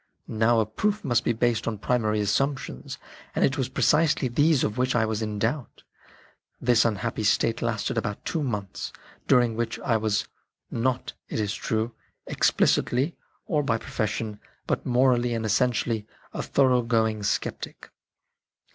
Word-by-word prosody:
Now 115 Hz, +1 st, +2 dB
a 110 Hz, -, +2 dB
proof 205 Hz, -, -1 dB
must 120 Hz, -2 st, +2 dB
be -, -, +2 dB
based 115 Hz, -1 st, 0 dB
on 110 Hz, -2 st, -1 dB
primary 110 Hz, -1 st, +1 dB
assumptions, 105 Hz, -, -1 dB, 0.4 s
and -, -, +4 dB
it 135 Hz, -, +1 dB
was 135 Hz, -3 st, -1 dB
precisely 145 Hz, +2 st, +2 dB
these 145 Hz, +3 st, +3 dB
of 105 Hz, -, -1 dB
which 125 Hz, 0 st, +1 dB
I 115 Hz, -2 st, +3 dB
was 110 Hz, 0 st, -2 dB
in 105 Hz, -1 st, -3 dB
doubt. 120 Hz, +6 st, -2 dB, 0.8 s
This 120 Hz, -2 st, +3 dB
unhappy 110 Hz, 0 st, -1 dB
state 115 Hz, +2 st, +2 dB
lasted 115 Hz, -3 st, -1 dB
about 100 Hz, 0 st, -5 dB
two 165 Hz, -, -1 dB
months, 105 Hz, -8 st, -3 dB, 0.4 s
during 120 Hz, -3 st, +4 dB
which 115 Hz, 0 st, -2 dB
I 115 Hz, -4 st, +2 dB
was, 110 Hz, -1 st, 0 dB, 0.4 s
not, 125 Hz, +2 st, -1 dB, 0.2 s
it -, -, -2 dB
is 105 Hz, -1 st, 0 dB
true, 110 Hz, +1 st, -2 dB, 0.3 s
explicitly 135 Hz, +7 st, +2 dB, 0.3 s
or 150 Hz, -, +1 dB
by 125 Hz, -5 st, +1 dB
profession, 105 Hz, -1 st, -3 dB, 0.3 s
but -, -, -2 dB
morally 125 Hz, -1 st, +3 dB
and 115 Hz, -1 st, -2 dB
essentially 110 Hz, -1 st, +1 dB, 0.3 s
a -, -, -3 dB
thorough 130 Hz, -3 st, +3 dB
going 110 Hz, -2 st, +1 dB
sceptic. 100 Hz, -, -3 dB
115 Hz, 150 wpm, -26 LUFS, 110-125 Hz, 0.8 s, and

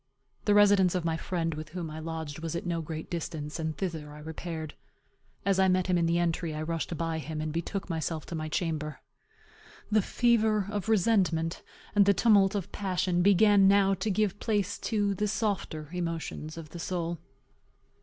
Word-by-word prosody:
The 205 Hz, -, +4 dB
residence 200 Hz, -3 st, +5 dB
of 180 Hz, -2 st, -1 dB
my 165 Hz, -1 st, +1 dB
friend, 165 Hz, -1 st, -2 dB
with 155 Hz, +1 st, -7 dB
whom 165 Hz, -1 st, -5 dB
I 155 Hz, -, -6 dB
lodged, 160 Hz, -2 st, -5 dB
was 165 Hz, 0 st, -4 dB
at 170 Hz, -, -3 dB
no 170 Hz, -1 st, -1 dB
great 160 Hz, 0 st, -6 dB
distance, 160 Hz, -3 st, -4 dB
and 160 Hz, -2 st, -3 dB
thither 160 Hz, -6 st, -4 dB
I -, -, -10 dB
repaired. 160 Hz, 0 st, -6 dB, 0.7 s
As 195 Hz, -1 st, +2 dB
I 190 Hz, -, +5 dB
met 185 Hz, -1 st, +2 dB
him 185 Hz, -, +1 dB
in 170 Hz, -1 st, +2 dB
the 170 Hz, +1 st, +2 dB
entry, 170 Hz, -2 st, -1 dB
I 155 Hz, -, -3 dB
rushed 165 Hz, +1 st, -3 dB
by 165 Hz, 0 st, -1 dB
him, 155 Hz, 0 st, -5 dB
and 155 Hz, 0 st, -3 dB
betook 170 Hz, +4 st, -3 dB
myself 160 Hz, -2 st, -3 dB
to -, -, -8 dB
my 155 Hz, -1 st, -3 dB
chamber. 155 Hz, -2 st, -2 dB, 0.9 s
The 215 Hz, 0 st, +5 dB
fever 220 Hz, -2 st, +2 dB
of 205 Hz, -1 st, -3 dB
resentment 180 Hz, -6 st, +2 dB, 0.3 s
and 200 Hz, -1 st, +5 dB
the 200 Hz, -, +5 dB
tumult 205 Hz, -3 st, +4 dB
of 195 Hz, -4 st, -3 dB
passion 185 Hz, -2 st, 0 dB
began 200 Hz, +1 st, +6 dB
now 195 Hz, 0 st, +5 dB
to 190 Hz, +3 st, -2 dB
give 205 Hz, 0 st, 0 dB
place 205 Hz, -3 st, -1 dB
to 205 Hz, -3 st, +1 dB
the 210 Hz, +2 st, -1 dB
softer 195 Hz, -8 st, -2 dB
emotions 165 Hz, -2 st, -4 dB
of 160 Hz, -2 st, -8 dB
the 170 Hz, -, -9 dB
soul. 170 Hz, -1 st, -3 dB
175 Hz, 185 wpm, -29 LUFS, 160-200 Hz, 0.9 s, began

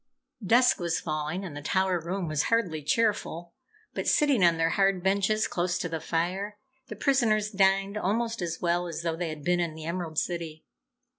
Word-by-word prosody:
Dusk 240 Hz, +6 st, +4 dB
was 170 Hz, -2 st, -1 dB
falling 155 Hz, +4 st, -3 dB
and 160 Hz, -6 st, -7 dB
the 145 Hz, -, -6 dB
tower 185 Hz, +3 st, +1 dB
room 175 Hz, +2 st, -3 dB
was 155 Hz, -2 st, 0 dB
hardly 180 Hz, -10 st, +1 dB
cheerful, 175 Hz, -1 st, -1 dB, 0.4 s
but -, -, -3 dB
sitting 280 Hz, -9 st, +3 dB
on 170 Hz, -1 st, +5 dB
their 165 Hz, 0 st, +1 dB
hard 195 Hz, -1 st, +2 dB
benches 200 Hz, +3 st, +2 dB
close 175 Hz, 0 st, -1 dB
to -, -, -2 dB
the 165 Hz, -1 st, -4 dB
fire, 185 Hz, +6 st, -2 dB, 0.3 s
the -, -, -7 dB
prisoners 220 Hz, -6 st, +2 dB
dined 195 Hz, 0 st, +2 dB
almost 225 Hz, +3 st, -1 dB
as 170 Hz, -1 st, -3 dB
well 175 Hz, 0 st, 0 dB
as 170 Hz, 0 st, -5 dB
though 165 Hz, -1 st, -1 dB
they 170 Hz, 0 st, -3 dB
had 155 Hz, -2 st, -7 dB
been 175 Hz, +2 st, +2 dB
in 170 Hz, -3 st, -2 dB
the 160 Hz, -1 st, -8 dB
Emerald 170 Hz, -2 st, -4 dB
City. 165 Hz, -3 st, -3 dB
180 Hz, 190 wpm, -27 LUFS, 165-200 Hz, 0.4 s, on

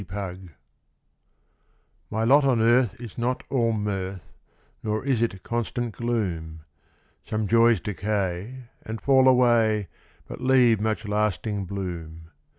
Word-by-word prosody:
MY 100 Hz, -, -10 dB
LOT 95 Hz, -2 st, -4 dB, 1.7 s
My 110 Hz, +1 st, -1 dB
lot 140 Hz, +5 st, +5 dB
on 130 Hz, -4 st, +2 dB
earth 115 Hz, -2 st, +3 dB
is 120 Hz, -2 st, -9 dB
not 125 Hz, +2 st, -1 dB
all 120 Hz, -4 st, +2 dB
mirth, 100 Hz, -4 st, -4 dB, 0.5 s
Nor 110 Hz, +3 st, -2 dB
is 130 Hz, -5 st, +1 dB
it 95 Hz, -5 st, -2 dB
constant 120 Hz, -1 st, -3 dB
gloom; 90 Hz, -10 st, -3 dB, 0.6 s
Some 110 Hz, -1 st, -2 dB
joys 115 Hz, 0 st, +4 dB
decay 105 Hz, +4 st, -3 dB, 0.2 s
and 110 Hz, 0 st, -6 dB
fall 135 Hz, -1 st, +4 dB
away, 115 Hz, -5 st, +3 dB, 0.4 s
But -, -, -8 dB
leave 125 Hz, -4 st, +4 dB
much 110 Hz, 0 st, -2 dB
lasting 105 Hz, -1 st, -1 dB
bloom. 85 Hz, -4 st, -6 dB
110 Hz, 125 wpm, -25 LUFS, 95-120 Hz, 1.7 s, lot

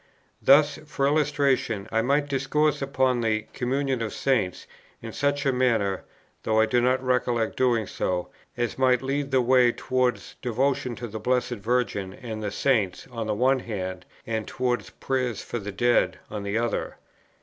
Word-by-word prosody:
Thus, 145 Hz, +2 st, +5 dB
for 140 Hz, -2 st, -1 dB
illustration, 140 Hz, -8 st, +1 dB
I 115 Hz, -, +2 dB
might 140 Hz, +4 st, +1 dB
discourse 145 Hz, +2 st, +1 dB
upon 130 Hz, -2 st, +1 dB
the 110 Hz, -1 st, 0 dB
"Communion 135 Hz, 0 st, -1 dB
of 115 Hz, -, -3 dB
Saints" 115 Hz, -10 st, 0 dB, 0.3 s
in 115 Hz, -1 st, -8 dB
such 145 Hz, 0 st, 0 dB
a 135 Hz, -, +3 dB
manner, 115 Hz, -7 st, +1 dB, 0.4 s
(though 110 Hz, 0 st, +1 dB
I 110 Hz, -, +5 dB
do 120 Hz, +2 st, +2 dB
not 130 Hz, +1 st, +2 dB
recollect 125 Hz, -3 st, 0 dB
doing 120 Hz, -4 st, +2 dB
so,) 90 Hz, -1 st, -2 dB, 0.3 s
as 120 Hz, +1 st, -2 dB
might 130 Hz, -1 st, +3 dB
lead 140 Hz, +1 st, -1 dB
the 130 Hz, -2 st, +3 dB
way 125 Hz, -1 st, +5 dB
towards 125 Hz, 0 st, -1 dB
devotion 125 Hz, 0 st, 0 dB
to 120 Hz, -, -6 dB
the 110 Hz, 0 st, -6 dB
Blessed 125 Hz, +1 st, 0 dB
Virgin 110 Hz, -5 st, -1 dB
and 110 Hz, -2 st, -7 dB
the 105 Hz, -, -2 dB
Saints 105 Hz, -3 st, 0 dB
on 115 Hz, -2 st, -4 dB
the 105 Hz, -, 0 dB
one 130 Hz, +4 st, +3 dB
hand, 95 Hz, -6 st, -5 dB, 0.2 s
and 110 Hz, -1 st, -3 dB
towards 125 Hz, -1 st, -1 dB
prayers 125 Hz, -4 st, -2 dB
for 120 Hz, -, -4 dB
the 105 Hz, 0 st, -6 dB
dead 100 Hz, -3 st, +2 dB
on 105 Hz, -1 st, -4 dB
the 100 Hz, +2 st, -2 dB
other. 120 Hz, 0 st, -2 dB
125 Hz, 170 wpm, -26 LUFS, 110-135 Hz, 0.4 s, Thus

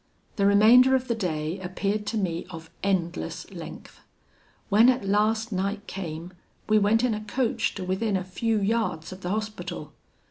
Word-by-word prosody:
"The 200 Hz, -1 st, +3 dB
remainder 235 Hz, +6 st, +7 dB
of 260 Hz, 0 st, -1 dB
the 235 Hz, -, +1 dB
day 170 Hz, -4 st, -2 dB
appeared 200 Hz, +3 st, -2 dB
to 220 Hz, +2 st, -1 dB
me 175 Hz, -4 st, -2 dB
of 165 Hz, -1 st, -10 dB
endless 175 Hz, -, -2 dB
length. -, -, -10 dB, 0.7 s
When 220 Hz, +5 st, +6 dB
at 250 Hz, -5 st, +1 dB
last 215 Hz, +3 st, +1 dB
night 200 Hz, +2 st, -2 dB
came, 175 Hz, -2 st, -6 dB, 0.3 s
we 215 Hz, 0 st, +4 dB
went 215 Hz, +3 st, +3 dB
in 250 Hz, -3 st, +2 dB
a 210 Hz, -, -3 dB
coach 235 Hz, +3 st, -1 dB
to 190 Hz, -, -5 dB
within 190 Hz, +3 st, 0 dB
a 185 Hz, -, -3 dB
few 220 Hz, +4 st, -1 dB
yards 205 Hz, -6 st, -1 dB
of 185 Hz, 0 st, -9 dB
the 180 Hz, -, -4 dB
Hospital. 215 Hz, +1 st, -4 dB
205 Hz, 170 wpm, -26 LUFS, 185-220 Hz, 0.7 s, remainder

